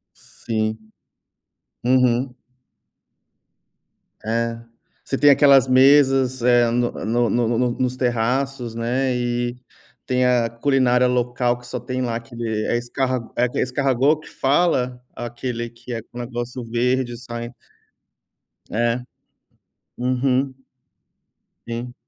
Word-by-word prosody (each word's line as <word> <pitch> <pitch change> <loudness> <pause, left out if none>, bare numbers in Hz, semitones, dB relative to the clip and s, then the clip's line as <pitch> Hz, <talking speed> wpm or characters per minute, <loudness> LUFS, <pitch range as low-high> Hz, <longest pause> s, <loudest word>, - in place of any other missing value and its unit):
Sim. 110 -1 -3 1.1
Uhum. 125 0 +2 1.9
É? 115 +1 -1 0.4
Você 135 - -2
tem 145 +2 +6
aquelas 140 -2 +6
mesas, 130 -1 +4
eh, 120 -1 +4
no 120 0 +1
no 120 +1 0
no 120 -1 +1
no 115 -1 0
no 125 -1 +2
nos 130 0 0
terraços, 125 0 -1
né, 125 +2 0
e 120 0 -1 0.5
tem 125 -1 +2
a 120 -2 +2
culinária 125 0 +2
local, 125 0 0
que 120 - -14
só 125 0 -4
tem 130 +2 -3
lá, 120 -2 -2
aquele 115 -2 -4
é - - +1
escarg 125 0 -2
é 125 0 +2
escargot 135 +3 +1
que - - -14
fala? 135 -4 +1
Aquele 120 0 -4
que 120 +1 -10
é 115 - -3
um 120 - -9
negócio 120 +1 -5
verde 120 +1 0
sai. 120 0 -7 1.2
É. 120 +2 0 1.0
Uhum. 130 +2 +1 1.2
Sim. 120 +1 -5
125 Hz, 115 wpm, -22 LUFS, 120-130 Hz, 1.9 s, tem